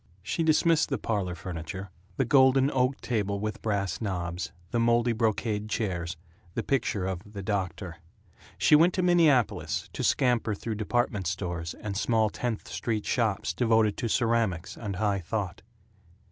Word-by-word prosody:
She 120 - -2
dismissed 160 0 +3
the - - 0
parlor 100 -5 -2
furniture 90 +2 -6 0.3
the 135 - +2
golden 130 +1 +5
oak 130 +1 +1
table 100 -4 -1
with 105 +1 -4
brass 100 -4 -1
knobs, 90 -4 -3 0.2
the 120 - +1
moldy 120 +1 +3
brocade 110 -1 -1
chairs, 90 -6 -2 0.4
the 115 - -1
picture 110 -8 0
of 95 -2 -3
"The 100 -2 -6
Doctor." 95 -4 -3 0.6
She - - +5
went 170 +4 +5
to 185 - +1
Minneapolis, 160 - +2
to - - -3
scamper 120 -4 +2
through 110 +3 -4
department 105 -4 0
stores 85 -3 -3
and 105 -2 -5
small 110 0 +2
Tenth 120 -3 -3
Street 110 -3 -2
shops 110 -5 0
devoted 110 -3 +3
to 120 - -1
ceramics 115 -8 0
and 105 -4 -5
high 100 +1 0
thought. 95 +1 -4
110 Hz, 150 wpm, -28 LUFS, 95-120 Hz, 0.6 s, golden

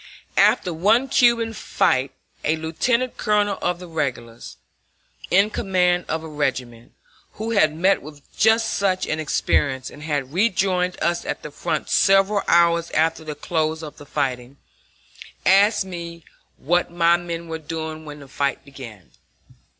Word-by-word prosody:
After 180 - +3
one 220 +11 +2
Cuban 235 -2 +3
fight 135 -11 0 0.3
a 155 - +1
lieutenant 230 +11 -1
colonel 205 -1 +1
of 175 0 0
the 180 0 -10
regulars, 130 -8 -5 0.7
in 200 +4 +3
command 180 -4 +1
of 160 0 -3
a - - -7
regiment, 130 -6 -4 0.4
who 225 +2 -5
had 155 -9 +3
met 185 +4 +2
with 145 0 -12
just 220 +1 +3
such 190 -2 0
an 155 - -2
experience 135 -3 0
and 145 - -13
had 145 -3 -3
rejoined 185 -2 +1
us 170 0 0
at - - -5
the - - -7
front - - -3
several 195 +1 +3
hours 170 0 +3
after 160 +1 +1
the 155 -1 -6
close 160 +1 -2
of 150 - -9
the 145 - -13
fighting, 130 -2 -3 0.9
asked 200 +1 +4
me 170 -2 -8 0.3
what 175 +5 0
my 170 0 +3
men 170 -1 -5
were 160 0 -5
doing 160 0 -6
when 150 -1 -10
the 140 - -12
fight 140 +1 -2
began. 120 -9 -12
170 Hz, 150 wpm, -22 LUFS, 150-190 Hz, 0.9 s, asked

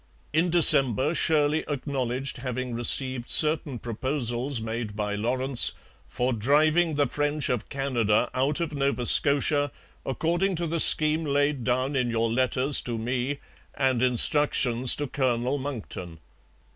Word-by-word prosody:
In 165 +3 +1
December 140 -4 +6
Shirley 155 -2 0
acknowledged 135 -2 -4
having 125 0 -6
received 120 +1 -1
certain 150 -4 +2
proposals 120 +2 -3
made 110 -1 -6
by 105 -1 -4
Lawrence 125 +5 +2 0.3
'for 125 +1 -3
driving 155 +8 +1
the 145 0 +1
French 145 +2 -3
of 120 -4 -4
Canada 120 -5 -1
out 135 +4 -2
of 165 -2 -4
Nova 140 -3 -2
Scotia 145 +2 +1 0.3
according 175 +7 -2
to 170 +1 -3
the 165 +1 -3
scheme 155 +1 +7
laid 145 -2 -1
down 130 +4 -2
in 125 -2 -1
your 115 -1 -2
letters 130 +3 +1
to 120 -2 -6
me 125 +4 -4 0.4
and 130 -3 -1
instructions 125 -1 +2
to 145 - -4
Colonel 130 0 -2
Monckton. 110 - -8
130 Hz, 135 wpm, -24 LUFS, 120-145 Hz, 0.4 s, scheme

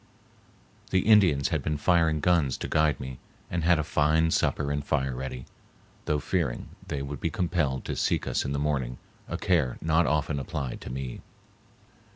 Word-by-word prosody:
The 95 - +3
Indians 95 -11 +4
had - - 0
been 75 -1 -1
firing 80 -1 +2
guns 80 -7 +2
to - - -4
guide 75 -4 +2
me 65 -1 -7 0.3
and 85 -2 -1
had 85 0 +4
a 75 - 0
fine 80 +2 +2
supper 70 -2 +1
and 75 0 -1
fire 65 -2 0
ready, 65 0 -5 0.6
though 75 - +1
fearing 75 -4 -2 0.2
they 70 -1 -3
would 70 0 -5
be - - 0
compelled 85 -7 -1
to - - -3
seek - - 0
us - - 0
in 70 - -3
the 70 - -1
morning, 70 -4 -1 0.3
a - - -3
care 75 -9 +1
not 80 0 +2
often 75 0 0
applied 70 -4 -4
to - - -7
me. 65 -1 -5
75 Hz, 180 wpm, -27 LUFS, 65-80 Hz, 0.6 s, Indians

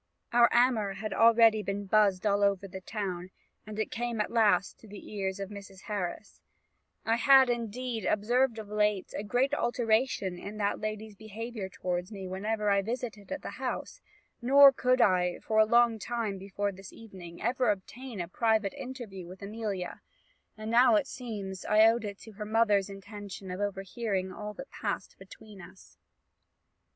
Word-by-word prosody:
"Our 235 0 +6
amour 235 -5 +3
had 215 +2 -5
already 225 -1 +5
been 200 0 -4
buzzed 200 -1 +3
all 205 -1 +2
over 200 -1 +1
the 190 0 -8
town; 185 -3 -4 0.4
and 215 0 -7
it 220 - -2
came 240 -1 -3
at 210 - -1
last 205 -5 +2
to 225 - -15
the 205 +1 -11
ears 195 -1 -3
of 195 +1 -5
Mrs. 195 -2 -10
Harris: 200 -1 -5 0.6
I 225 +1 +2
had, 265 0 +6
indeed, 235 -1 -3
observed 235 +3 +2
of 215 -2 -7
late 210 -2 0
a - - -2
great 250 +6 +1
alteration 230 -7 0
in 205 +3 -7
that 205 -1 0
lady's 215 0 -5
behaviour 220 0 -6
towards 180 +1 -3
me 195 -3 -7
whenever 210 +3 -1
I 200 0 +3
visited 225 -1 -5
at 285 - -4
the - - -7
house; - - -4 0.4
nor 275 +3 +8
could 255 -1 +2
I, 180 -4 +3
for 220 0 0
a 215 - +7
long 235 0 +4
time 220 -3 -3
before 200 +1 -3
this 195 0 -12
evening, 185 -6 -11
ever 250 0 +1
obtain 215 +4 -4
a 175 - -3
private 220 +1 +1
interview 245 -9 -8
with 185 +2 -11
Amelia; 205 -3 -4 0.6
and 215 +1 -5
now, 245 +4 +6
it 305 -3 +2
seems, 205 -8 -6
I 215 +1 +5
owed 225 0 +3
it 200 -1 -6
to 220 - -11
her 210 0 -7
mother's 210 -3 +2
intention 195 -1 -8
of 180 - -5
overhearing 195 -1 -2
all 210 0 -7
that 270 +1 -9
passed - - -4
between 210 -3 -13
us. 185 +2 -16
210 Hz, 170 wpm, -29 LUFS, 195-230 Hz, 0.6 s, nor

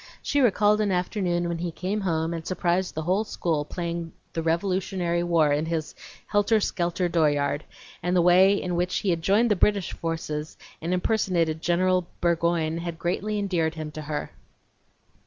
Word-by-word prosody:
She 285 - +1
recalled 210 -3 +4
an 205 -2 +1
afternoon 180 -1 0
when 170 -1 -3
he 175 0 -2
came 190 +5 -3
home 165 -3 0
and 165 -1 -4
surprised 180 +1 -1
the 160 - -2
whole 185 +6 +1
school 165 -7 -1
playing 170 0 -4 0.2
the 165 - -1
Revolutionary 175 +1 0
War 165 -4 +3
in 150 +2 0
his 160 -2 -2 0.3
helter 205 +2 +2
skelter 175 -2 -1
dooryard, 150 -3 +1 0.4
and 180 +2 0
the 180 - +5
way 185 +3 +6
in 180 -1 -2
which 180 +1 0
he 195 - 0
had 165 -1 -1
joined 210 +6 +3
the - - +4
British 200 0 +1
forces 160 -2 -4 0.2
and 165 +2 -2
impersonated 180 -4 +1
General 180 +1 +2
Burgoyne 170 -1 +1
had 170 -1 -5
greatly 195 +5 -2
endeared 175 -6 0
him 155 -1 -5
to 155 - -7
her. 150 -1 -4
175 Hz, 170 wpm, -26 LUFS, 165-190 Hz, 0.4 s, way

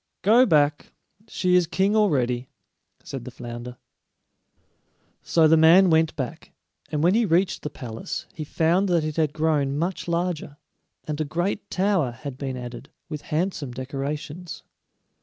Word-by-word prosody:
"Go 235 +6 +6
back. 150 -4 +2 0.3
She 180 -4 0
is 180 -2 +4
king 195 +4 +1
already," 130 - +1 0.5
said 135 -3 -7
the 125 - -7
flounder. 120 0 -8 1.4
So 160 -2 +3
the 160 - +6
man 170 +3 +6
went 160 0 +3
back, 150 +4 -6 0.4
and 150 -1 -1
when 175 +3 +4
he 235 +2 +3
reached 185 -1 +1
the 150 - -4
palace 115 -6 -6
he 165 -5 -5
found 170 +6 +1
that 170 -3 +2
it 155 0 -4
had 155 -3 +2
grown 150 -3 0
much 175 +4 -2
larger, 170 -4 -2 0.5
and 155 0 -4
a - - +2
great 175 +7 -2
tower 190 -7 +1
had 130 +3 -7
been 135 -2 -4
added, 125 +2 -8 0.2
with 150 -2 -5
handsome 155 -5 -2
decorations. 145 +6 -5
155 Hz, 150 wpm, -24 LUFS, 140-180 Hz, 1.4 s, Go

